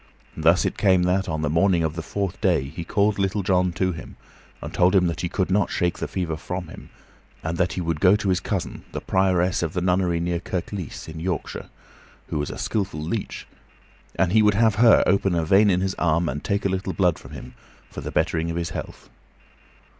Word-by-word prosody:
Thus 85 +3 +3
it - - -2
came 95 -3 +4
that, 95 +2 +1
on 80 -1 -2
the - - +1
morning 85 +1 +3
of 80 0 -1
the 85 - -3
fourth 100 +1 -4
day, 90 -9 +2
he 80 +5 -7
called 100 +3 +1
Little 100 +1 0
John 90 -1 +2
to 95 +1 0
him, 80 - -9 0.4
and - - -8
told 90 +2 +3
him 90 -2 +5
that 85 -1 -2
he 85 - -2
could 95 0 -1
not 95 -1 +2
shake 90 0 -1
the - - -3
fever 85 -4 -3
from 90 +1 -5
him, - - -11 0.5
and 80 +1 -2
that 90 -1 +1
he 90 - -3
would 85 -2 -2
go 95 +4 +5
to 105 -2 -1
his 90 -1 +2
cousin, 95 0 -4
the - - -3
prioress 95 -1 +1
of 80 -2 -2
the 90 - -1
nunnery 90 -1 +1
near 85 0 -1
Kirklees, 90 0 -5
in 80 0 -8
Yorkshire, 85 -2 -4 0.6
who - - -2
was 75 - -2
a - - -6
skillful 100 -7 -2
leech, 85 +8 -4 0.7
and 95 -2 +1
he 110 +2 +5
would 105 -1 +4
have 110 0 +4
her 115 -2 +7
open 95 -1 +2
a 85 -1 0
vein 100 +5 +5
in 90 -1 +2
his 95 0 -1
arm 85 0 +2
and 70 +3 -4
take 100 0 -1
a - - +3
little 95 0 -2
blood 90 -4 +1
from - - -13
him, - - -9 0.4
for - - -7
the - - -5
bettering 80 0 0
of 85 - -3
his 85 -1 -3
health. - - -7
90 Hz, 225 wpm, -23 LUFS, 85-95 Hz, 0.7 s, her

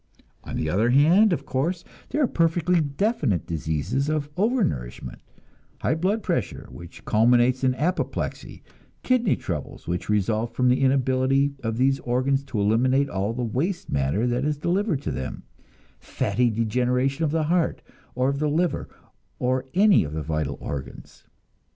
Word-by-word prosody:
On - - -7
the 80 - -2
other 105 +9 +2
hand, 165 - +5
of 170 - -1
course, 165 +7 -1 0.3
there 300 - +1
are - - +3
perfectly 170 -1 +2
definite 145 - 0
diseases 85 - -2
of 150 -1 -2
overnourishment; 185 - -1 0.6
high - - +1
blood 190 +7 0
pressure, 170 - -2
which 85 +2 -12
culminates 120 +4 +3
in 130 -1 +2
apoplexy; 175 +7 -3 0.4
kidney 245 -5 +2
troubles, 80 -6 -6
which 90 +3 -3
result 110 +2 0
from 125 -1 +3
the 125 - +2
inability 135 +1 +2
of 115 -2 -3
these 135 +2 +2
organs 130 +3 0
to 115 -6 -3
eliminate 130 +7 +2
all 100 +2 -1
the 125 +2 -3
waste 150 - -2
matter 70 - 0
that 125 +1 0
is 150 0 0
delivered 175 -1 0
to - - -2
them; 65 0 -5 0.6
fatty 120 +5 0
degeneration 125 +6 0
of 155 - +2
the 160 +1 0
heart, 170 +2 0 0.3
or 130 +1 +1
of 140 0 -2
the 150 0 +1
liver, 170 +3 0 0.5
or 130 +1 0
any 200 +1 +5
of 75 -1 -6
the 80 0 -3
vital 75 -3 -2
organs. 65 -2 -8
130 Hz, 155 wpm, -24 LUFS, 110-160 Hz, 0.6 s, hand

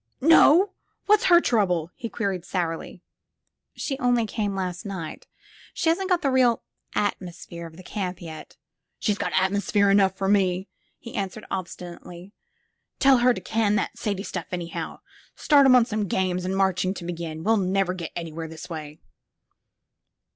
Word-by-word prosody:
Not 330 +5 +6 0.4
What's 425 +3 +4
her 345 -5 +7
trouble?" 180 - +1
he 230 - -6
queried 195 -7 -2
sourly. 170 -1 -4 0.7
She 270 -2 -3
only 245 -2 +2
came 210 -2 -2
last 180 -2 -3
night. 185 -6 -6 0.5
She 325 - +1
hasn't 370 +4 0
got 360 -2 +2
the 275 - +2
real 250 -3 +3 0.3
atmosphere 175 -4 -3
of 160 0 -15
the 185 - -11
camp 185 -2 -4
yet." 160 -2 -10 0.2
*' - - -56
She's 205 -2 0
got - - -1
atmosphere 200 +1 +2
enough 195 -1 +3
for 195 - -1
me," 190 -1 +2 0.3
he 235 - -11
answered 200 +1 -4
obstinately. 180 0 -7 0.6
Tell 270 -2 +5
her 250 +1 +5
to - - -3
can 215 -2 +1
that 210 - -1
Sadie 205 -4 -3
stuff, 180 -5 -5
anyhow. 175 -2 -5 0.3
Start 285 -3 +5
'em 255 - +7
on 245 -2 +6
some 215 -3 -2
games 180 0 -1
and 190 +1 -1
marching, 190 0 +1
to 175 - -7
begin. 165 -2 -5
We 220 - +2
'11 195 -5 +2
never 195 -2 +1
get 170 -3 -6
anywhere 165 -1 -5
this 160 0 -9
way." 155 -2 -7
195 Hz, 165 wpm, -25 LUFS, 175-230 Hz, 0.7 s, her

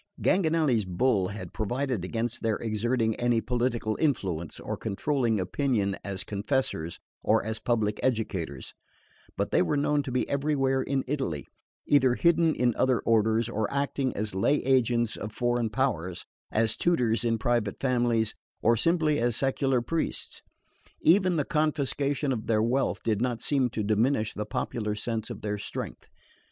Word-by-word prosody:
Ganganelli's 160 - +2
bull 95 +1 +1
had 105 +3 -7
provided 125 -1 -2
against 115 +5 -3
their 110 -2 +1
exerting 115 +1 0
any 120 -1 +2
political 120 -2 -1
influence, 95 - -1
or - - -4
controlling 120 0 0
opinion 100 0 0
as 100 -1 -3
confessors 100 - -2 0.2
or - - +2
as 110 0 -3
public 110 -3 0
educators; 95 - -2 0.6
but - - -1
they - - +4
were 145 +11 +1
known 145 +1 +2
to 135 -2 -6
be 125 - 0
everywhere 135 -2 +1
in 135 0 -1
Italy, 130 - -2 0.4
either 130 -4 +4
hidden 170 0 +3
in 120 -1 +2
other 130 -2 +3
orders, 110 0 +2
or 110 -3 -2
acting 140 -1 0
as 105 -1 -2
lay 95 +10 +2
agents 120 -3 +2
of 105 - -6
foreign 120 0 0
powers, 105 -7 -1 0.3
as 110 0 +2
tutors 125 -10 +1
in 115 -1 +1
private 120 -3 0
families, 120 -4 +1 0.3
or 115 +1 +5
simply 155 +3 +2
as 120 -1 +1
secular 135 -1 +1
priests. 165 +5 -3 0.6
Even 185 +2 +4
the 150 -3 0
confiscation 145 -2 0
of 115 -4 -3
their 110 -1 +2
wealth 130 +4 0
did 110 -2 0
not 120 -2 0
seem 135 -4 +1
to 110 -2 -3
diminish 110 +2 +1
the 105 0 -4
popular 105 0 -2
sense 110 +1 -3
of - - -7
their 105 -1 -2
strength. - - -6
120 Hz, 155 wpm, -28 LUFS, 110-135 Hz, 0.6 s, or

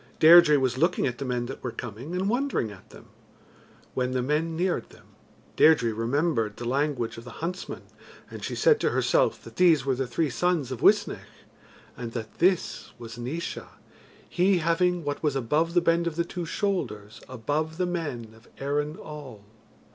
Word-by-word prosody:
Deirdre 160 -2 +8
was 130 -1 0
looking 170 +3 +2
at 120 -2 -3
the 140 - -3
men 125 -1 -1
that 135 +2 -7
were 125 - -2
coming, 120 +8 -7
and 185 +2 -1
wondering 245 - 0
at 95 - -15
them. - - -15 0.8
When 125 0 -1
the 125 -1 0
men 155 +4 0
neared 180 +2 -1
them, - - -18 0.5
Deirdre 125 -8 +5
remembered 115 -1 0
the 120 - -6
language 130 -3 -1
of - - -11
the 125 - -10
huntsman, 180 +3 -5 0.5
and - - -8
she - - -3
said 465 -2 +4
to - - +1
herself - - +1
that - - -13
these 165 -7 +4
were 135 - +2
the 130 0 -2
three 150 +3 -1
sons 155 0 0
of 130 - -5
Uisnech, - - +3 0.7
and 115 -2 -7
that 110 -3 -7
this 180 +1 +1
was 115 0 -9
Naois, 145 +8 -5 0.6
he 185 +1 +2
having 175 +1 +1
what 145 0 -3
was 150 -3 0
above 150 +7 0
the 175 - +5
bend 170 0 +2
of 165 - -3
the 170 0 0
two 175 -1 -5
shoulders 120 - -3
above 145 +6 -2
the 180 - +1
men 145 -11 -4
of 110 +1 -20
Erin 145 +3 -2
all. 140 - -10
150 Hz, 180 wpm, -26 LUFS, 120-170 Hz, 0.8 s, Deirdre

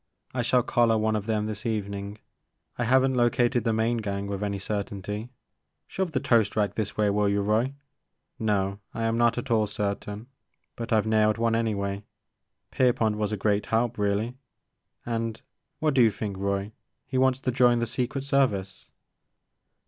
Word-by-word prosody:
I 125 - 0
shall 125 +1 +3
collar 115 -1 +3
one 110 0 +1
of 105 0 -3
them 105 -1 0
this 110 0 -5
evening. 100 -2 -3 0.6
I 120 - -1
have 130 +2 +4
n't 130 -1 0
located 120 -1 +2
the 115 - +1
main 110 +2 +1
gang 100 -2 -3
with 100 0 -4
any 100 -1 -1
cer 100 +1 -2
tainty, 105 +4 -6 0.3
— - - -54
shove 190 -1 -2
the 145 -5 -1
toast 115 -5 +2
rack 105 -3 +1
this 105 -1 -3
way 105 -1 +3
will 105 0 +2
you, 100 0 +1
Roy, 110 +7 +1 0.3
— - - -52
no, 100 -1 0 0.2
I 115 - -2
am 115 0 +1
not 120 0 +3
at 120 +1 -4
all 110 -2 +3
certain, 105 0 -3 0.5
but 115 0 -6
I 110 - +5
've 105 - -1
nailed 110 0 +3
one 115 0 +1
anyway. 100 -3 -1 0.7
Pierpont 115 -4 +2
was 105 -1 -1
a 105 - -1
great 105 +1 0
help, 115 0 0
really, 105 +4 0 0.4
— - - -48
and, 115 -1 -2 0.4
what 155 -2 +1
do 130 - +5
you 115 - +6
think, 105 -1 -4
Roy? 100 +1 -2 0.3
He 130 -1 -1
wants 130 0 +3
to 130 - 0
join 120 -1 +4
the 120 - 0
Secret 125 +4 -2
Service 125 -10 0
110 Hz, 190 wpm, -27 LUFS, 100-120 Hz, 0.7 s, you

